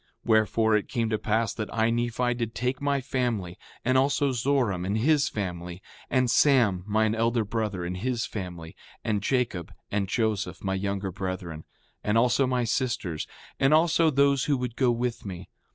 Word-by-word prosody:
5:6 -, -, -39 dB, 0.2 s
Wherefore, 110 Hz, 0 st, +3 dB
it 105 Hz, -, -1 dB
came 115 Hz, -2 st, -1 dB
to 110 Hz, -, 0 dB
pass 110 Hz, 0 st, 0 dB
that 110 Hz, -2 st, -5 dB
I, 115 Hz, 0 st, +1 dB
Nephi, 120 Hz, +1 st, 0 dB
did 115 Hz, -2 st, -4 dB
take 125 Hz, +3 st, -2 dB
my 140 Hz, -1 st, +1 dB
family, 120 Hz, -9 st, -2 dB, 0.3 s
and 130 Hz, +2 st, +4 dB
also 140 Hz, +1 st, +2 dB
Zoram 125 Hz, -7 st, 0 dB
and 100 Hz, +4 st, -1 dB
his 145 Hz, +5 st, +3 dB
family, 90 Hz, -3 st, -5 dB, 0.3 s
and 130 Hz, -1 st, +2 dB
Sam, 115 Hz, -8 st, +4 dB
mine 110 Hz, +1 st, +2 dB
elder 115 Hz, 0 st, +1 dB
brother 105 Hz, -4 st, -2 dB
and 90 Hz, +1 st, -4 dB
his 120 Hz, +3 st, -1 dB
family, 90 Hz, -5 st, -7 dB, 0.3 s
and 105 Hz, -2 st, 0 dB
Jacob 100 Hz, -, -1 dB, 0.2 s
and 100 Hz, -1 st, 0 dB
Joseph, 110 Hz, -3 st, -1 dB
my 95 Hz, -1 st, -1 dB
younger 100 Hz, 0 st, -2 dB
brethren, 90 Hz, -4 st, -5 dB, 0.4 s
and 105 Hz, +2 st, +1 dB
also 125 Hz, +3 st, +3 dB
my 125 Hz, -1 st, +1 dB
sisters, 115 Hz, -, -2 dB, 0.3 s
and 135 Hz, +3 st, +5 dB
all 160 Hz, +2 st, +5 dB
those 140 Hz, -5 st, +3 dB
who 145 Hz, -2 st, +2 dB
would 125 Hz, -2 st, -4 dB
go 130 Hz, -2 st, +2 dB
with 120 Hz, 0 st, -1 dB
me. 95 Hz, -2 st, -7 dB
115 Hz, 175 wpm, -27 LUFS, 100-125 Hz, 0.4 s, and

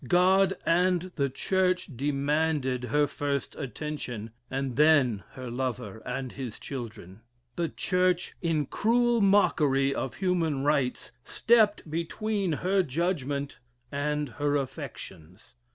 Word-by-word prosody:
God 190 Hz, +2 st, +4 dB
and 180 Hz, +1 st, +2 dB
the 140 Hz, -3 st, +1 dB
Church 185 Hz, +6 st, +1 dB
demanded 140 Hz, -1 st, 0 dB
her 145 Hz, +5 st, +2 dB
first 140 Hz, -2 st, -3 dB
attention, 125 Hz, -5 st, -5 dB, 0.2 s
and 135 Hz, -2 st, -2 dB
then 145 Hz, -9 st, +4 dB
her 130 Hz, -2 st, -7 dB
lover 120 Hz, -4 st, -3 dB
and 125 Hz, 0 st, -3 dB
his 125 Hz, -5 st, -6 dB
children. 110 Hz, -7 st, -8 dB, 0.3 s
The 170 Hz, -2 st, -1 dB
Church, 180 Hz, -1 st, +1 dB
in 160 Hz, -4 st, +1 dB
cruel 235 Hz, -, +2 dB
mockery 145 Hz, -9 st, +3 dB
of 130 Hz, -, -3 dB
human 165 Hz, -7 st, 0 dB
rights, 140 Hz, -3 st, 0 dB
stepped 220 Hz, -, +3 dB
between 190 Hz, +5 st, -2 dB
her 190 Hz, +1 st, +4 dB
judgment 145 Hz, -3 st, -2 dB, 0.3 s
and 150 Hz, +1 st, -1 dB
her 145 Hz, +4 st, -1 dB
affections. 130 Hz, -, -6 dB
145 Hz, 115 wpm, -28 LUFS, 130-180 Hz, 0.3 s, God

